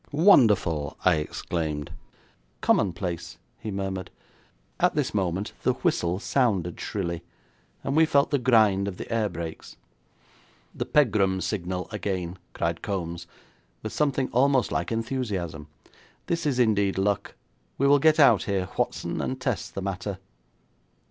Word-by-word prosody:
'Wonderful!' 110 Hz, -, +4 dB
I 90 Hz, -3 st, +5 dB
exclaimed. 75 Hz, -1 st, -3 dB, 0.7 s
'Commonplace,' 85 Hz, -3 st, 0 dB, 0.2 s
he 110 Hz, -, -6 dB
murmured. 95 Hz, -2 st, -3 dB, 0.7 s
At -, -, +3 dB
this -, -, 0 dB
moment 95 Hz, 0 st, -1 dB
the -, -, +2 dB
whistle 85 Hz, +1 st, 0 dB
sounded 100 Hz, -7 st, 0 dB
shrilly, 85 Hz, -5 st, -3 dB, 0.6 s
and 135 Hz, -, -1 dB
we 160 Hz, 0 st, +5 dB
felt 140 Hz, -2 st, +3 dB
the 145 Hz, -, +2 dB
grind 110 Hz, -6 st, +4 dB
of 95 Hz, -2 st, -5 dB
the -, -, -6 dB
air 110 Hz, -2 st, +1 dB
brakes. 85 Hz, -2 st, -7 dB, 1.0 s
'The -, -, -4 dB
Pegram 100 Hz, -9 st, +3 dB
signal 90 Hz, -2 st, -3 dB
again,' 95 Hz, -4 st, -3 dB
cried 85 Hz, 0 st, -2 dB
Kombs, 85 Hz, -3 st, -4 dB, 0.6 s
with 110 Hz, -, -5 dB
something 140 Hz, -3 st, +1 dB
almost 130 Hz, +1 st, +3 dB
like -, -, -1 dB
enthusiasm. 105 Hz, -, -3 dB, 0.6 s
'This 170 Hz, -2 st, -1 dB
is 135 Hz, -4 st, 0 dB
indeed 100 Hz, -5 st, +2 dB
luck. 100 Hz, +1 st, 0 dB, 0.4 s
We 140 Hz, -, +1 dB
will 140 Hz, +1 st, +6 dB
get 155 Hz, +2 st, +4 dB
out 120 Hz, -8 st, +6 dB
here, 95 Hz, -2 st, -1 dB
Whatson, -, -, -1 dB
and 130 Hz, 0 st, -3 dB
test 130 Hz, -4 st, -3 dB
the 95 Hz, -, -3 dB
matter.' 95 Hz, 0 st, -3 dB
100 Hz, 135 wpm, -26 LUFS, 90-125 Hz, 1.0 s, will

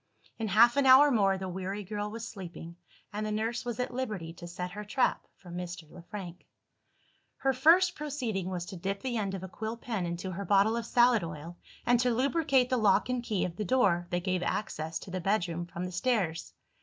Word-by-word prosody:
In 225 Hz, -, -1 dB
half 235 Hz, +6 st, +5 dB
an 280 Hz, -1 st, +4 dB
hour 275 Hz, +3 st, +8 dB
more, 195 Hz, -5 st, +3 dB
the 190 Hz, 0 st, -5 dB
weary 190 Hz, +3 st, -4 dB
girl 205 Hz, +1 st, -4 dB
was 225 Hz, +1 st, -6 dB
sleeping, 170 Hz, -3 st, -9 dB, 0.4 s
and 210 Hz, +1 st, -2 dB
the 215 Hz, -, -2 dB
nurse 225 Hz, +2 st, -1 dB
was 240 Hz, -2 st, -4 dB
at 250 Hz, -, -2 dB
liberty 210 Hz, -10 st, -4 dB
to 170 Hz, 0 st, -10 dB
set 180 Hz, +1 st, -5 dB
her 210 Hz, +3 st, -6 dB
trap 250 Hz, +5 st, 0 dB
for 180 Hz, -3 st, -13 dB
Mr. 175 Hz, -2 st, -6 dB
Le 180 Hz, -, -11 dB
Frank. 180 Hz, -2 st, -9 dB, 0.9 s
Her 270 Hz, 0 st, +1 dB
first 340 Hz, +7 st, +5 dB
proceeding 250 Hz, -, -3 dB
was 180 Hz, -2 st, -3 dB
to 190 Hz, -, -8 dB
dip 195 Hz, +3 st, -3 dB
the 250 Hz, -3 st, -1 dB
end 195 Hz, -3 st, -2 dB
of 190 Hz, -, -6 dB
a -, -, -5 dB
quill 220 Hz, +5 st, -5 dB
pen 220 Hz, -7 st, -3 dB
into 170 Hz, +2 st, -4 dB
her 190 Hz, +3 st, -4 dB
bottle 200 Hz, +3 st, +3 dB
of 235 Hz, -1 st, -3 dB
salad 240 Hz, -3 st, +4 dB
oil, 165 Hz, +1 st, -7 dB, 0.3 s
and 245 Hz, 0 st, +4 dB
to 250 Hz, 0 st, +2 dB
lubricate 270 Hz, -1 st, +2 dB
the 255 Hz, -, +3 dB
lock 210 Hz, +1 st, +3 dB
and 250 Hz, -1 st, 0 dB
key 215 Hz, -5 st, -1 dB
of 175 Hz, -1 st, -6 dB
the 215 Hz, -, -1 dB
door 190 Hz, -6 st, +2 dB
that 175 Hz, 0 st, -1 dB
gave 185 Hz, -1 st, 0 dB
access 165 Hz, -6 st, -2 dB
to 185 Hz, -, -9 dB
the 185 Hz, 0 st, -3 dB
bedroom 175 Hz, -3 st, 0 dB
from 175 Hz, 0 st, -6 dB
the 180 Hz, -, -5 dB
stairs. 185 Hz, -4 st, -1 dB
205 Hz, 215 wpm, -30 LUFS, 180-240 Hz, 0.9 s, hour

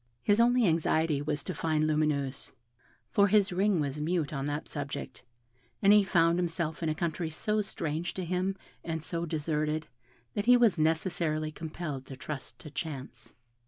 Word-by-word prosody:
His 205 Hz, +1 st, +3 dB
only 240 Hz, 0 st, +5 dB
anxiety 160 Hz, -3 st, +2 dB
was 145 Hz, -1 st, -2 dB
to -, -, -3 dB
find 155 Hz, -1 st, 0 dB
Lumineuse; 150 Hz, -3 st, 0 dB, 0.6 s
for 200 Hz, 0 st, +5 dB
his 200 Hz, -2 st, +3 dB
ring 195 Hz, 0 st, +2 dB
was 145 Hz, 0 st, -2 dB
mute 160 Hz, -1 st, 0 dB
on 135 Hz, -1 st, -2 dB
that 145 Hz, +2 st, -3 dB
subject, 145 Hz, -2 st, -5 dB, 0.6 s
and 200 Hz, +1 st, +6 dB
he 210 Hz, -1 st, +7 dB
found 170 Hz, -2 st, +3 dB
himself 165 Hz, -2 st, -2 dB
in 165 Hz, -, 0 dB
a 155 Hz, -, 0 dB
country 170 Hz, -1 st, -2 dB
so 210 Hz, +7 st, 0 dB
strange 165 Hz, -3 st, -3 dB
to 185 Hz, -, -3 dB
him, 185 Hz, +2 st, 0 dB, 0.3 s
and 160 Hz, -2 st, -3 dB
so 170 Hz, 0 st, -3 dB
deserted, 155 Hz, 0 st, -1 dB, 0.5 s
that 205 Hz, -, -2 dB
he 250 Hz, 0 st, +8 dB
was 230 Hz, -8 st, +4 dB
necessarily 155 Hz, -1 st, 0 dB
compelled 155 Hz, -4 st, -6 dB
to 135 Hz, -, -8 dB
trust 135 Hz, -4 st, -6 dB
to 140 Hz, +4 st, -11 dB
chance. 145 Hz, -3 st, -6 dB
160 Hz, 165 wpm, -30 LUFS, 150-180 Hz, 0.6 s, he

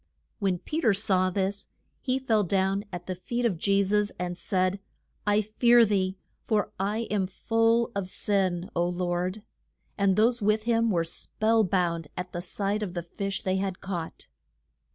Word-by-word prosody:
When 195 Hz, -4 st, +1 dB
Pe 305 Hz, -, -4 dB
ter 220 Hz, -8 st, +4 dB
saw 185 Hz, -2 st, +2 dB
this 195 Hz, +1 st, -2 dB, 0.3 s
he 260 Hz, -1 st, 0 dB
fell 225 Hz, -5 st, +2 dB
down 195 Hz, +2 st, 0 dB
at 175 Hz, -1 st, -6 dB
the 185 Hz, -, -3 dB
feet 235 Hz, +7 st, -3 dB
of 190 Hz, -8 st, 0 dB
Je 200 Hz, +2 st, +3 dB
sus, 205 Hz, +1 st, +1 dB
and 180 Hz, 0 st, -3 dB
said, 185 Hz, +1 st, 0 dB, 0.5 s
I 205 Hz, +1 st, +4 dB
fear 235 Hz, +3 st, +5 dB
thee, 190 Hz, -2 st, 0 dB, 0.3 s
for 210 Hz, -2 st, 0 dB
I 205 Hz, +3 st, 0 dB
am 200 Hz, -3 st, +1 dB
full 225 Hz, +4 st, +1 dB
of 200 Hz, -2 st, -2 dB
sin, 185 Hz, -2 st, 0 dB
O 170 Hz, -, +2 dB
Lord. 180 Hz, +3 st, -2 dB, 0.6 s
And 195 Hz, -1 st, +3 dB
those 235 Hz, +3 st, +3 dB
with 215 Hz, +1 st, +2 dB
him 230 Hz, 0 st, +2 dB
were 170 Hz, -5 st, +2 dB
spell 220 Hz, +6 st, +1 dB
bound 170 Hz, -4 st, 0 dB
at 180 Hz, 0 st, -5 dB
sight 200 Hz, +3 st, -1 dB
of 185 Hz, -4 st, -4 dB
the 175 Hz, -, -2 dB
fish 195 Hz, +4 st, -4 dB
they 190 Hz, 0 st, +1 dB
had 190 Hz, -1 st, -2 dB
caught. 175 Hz, -4 st, -5 dB
195 Hz, 170 wpm, -27 LUFS, 185-215 Hz, 0.6 s, fear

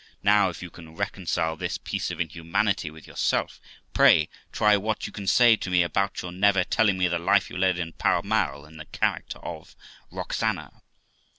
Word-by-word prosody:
Now, 100 Hz, -1 st, +4 dB
if 90 Hz, -, -8 dB
you 90 Hz, -, -9 dB
can 80 Hz, -2 st, -13 dB
reconcile 90 Hz, -4 st, -2 dB
this -, -, -3 dB
piece -, -, -4 dB
of -, -, -6 dB
inhumanity 85 Hz, +2 st, -1 dB
with 80 Hz, 0 st, -14 dB
yourself, -, -, -1 dB, 0.3 s
pray 75 Hz, -1 st, +5 dB, 0.2 s
try 105 Hz, -1 st, +4 dB
what 105 Hz, +2 st, -2 dB
you -, -, -7 dB
can 100 Hz, -2 st, -7 dB
say 120 Hz, +2 st, +6 dB
to 95 Hz, -, -5 dB
me 90 Hz, -1 st, +3 dB
about 100 Hz, +3 st, -1 dB
your 90 Hz, -, -6 dB
never 95 Hz, +1 st, +3 dB
telling 105 Hz, -1 st, +2 dB
me 90 Hz, -1 st, +2 dB
the 85 Hz, -1 st, -1 dB
life 85 Hz, -, +2 dB
you -, -, -6 dB
led 95 Hz, -1 st, +2 dB
in 85 Hz, -1 st, -4 dB
Pall 85 Hz, -, +1 dB
Mall, 85 Hz, -10 st, -1 dB
in 80 Hz, +1 st, -15 dB
the 80 Hz, -, -9 dB
character -, -, -2 dB
of -, -, -8 dB, 0.3 s
Roxana? -, -, -3 dB
90 Hz, 190 wpm, -25 LUFS, 85-100 Hz, 0.3 s, say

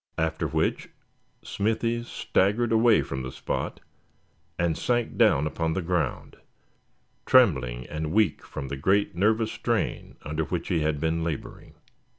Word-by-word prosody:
After -, -, -1 dB
which -, -, -1 dB, 0.5 s
Smithy 115 Hz, +3 st, -1 dB
staggered 115 Hz, 0 st, 0 dB
away 115 Hz, 0 st, +5 dB
from 65 Hz, -1 st, -5 dB
the 65 Hz, 0 st, -5 dB
spot, -, -, -4 dB, 0.8 s
and 85 Hz, -2 st, +1 dB
sank 120 Hz, +3 st, -1 dB
down 70 Hz, -, +4 dB
upon 80 Hz, +1 st, -1 dB
the 95 Hz, -, -1 dB
ground, 85 Hz, -5 st, -2 dB, 0.9 s
trembling 65 Hz, -, +4 dB
and 75 Hz, 0 st, -4 dB
weak 105 Hz, -5 st, +2 dB
from 70 Hz, -1 st, -7 dB
the 70 Hz, -, -4 dB
great 95 Hz, +8 st, +2 dB
nervous 110 Hz, +4 st, +2 dB
strain 115 Hz, -4 st, -2 dB
under 75 Hz, +1 st, -2 dB
which 85 Hz, 0 st, -4 dB
he 85 Hz, -4 st, +1 dB
had 75 Hz, -1 st, 0 dB
been 80 Hz, +1 st, 0 dB
laboring. 80 Hz, -4 st, -6 dB
85 Hz, 140 wpm, -26 LUFS, 75-110 Hz, 0.9 s, away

